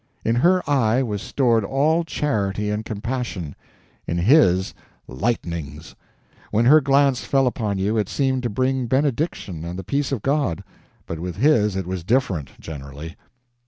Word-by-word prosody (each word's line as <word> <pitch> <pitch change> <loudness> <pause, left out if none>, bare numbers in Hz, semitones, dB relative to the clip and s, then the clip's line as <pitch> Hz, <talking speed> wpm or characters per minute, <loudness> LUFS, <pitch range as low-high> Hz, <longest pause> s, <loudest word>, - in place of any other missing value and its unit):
In 115 - +2
her 180 +7 +3
eye 130 -3 +2
was 105 -5 -3
stored 120 -5 +1
all 150 +9 +1
charity 105 -10 -1
and 105 +1 -2
compassion, 110 - -4 0.5
in 85 - -1
his 95 - +4 0.3
lightnings; 80 - -4 0.6
when 115 +3 +1
her 155 +5 +7
glance 140 -1 +2
fell 135 -1 +2
upon 110 -5 -1
you 105 +4 0
it 105 - -1
seemed 130 -2 0
to 120 - -2
bring 130 +3 0
benediction 130 - -1
and 85 +1 -5
the 95 - -5
peace 140 +9 -1
of 130 -7 -2
God, 140 - 0 0.4
but 80 - -6
with 90 0 -5
his 105 - +3
it 95 -2 -2
was 90 -1 -4
different, 95 - -1
generally. 75 +2 -8
110 Hz, 155 wpm, -22 LUFS, 90-135 Hz, 0.6 s, her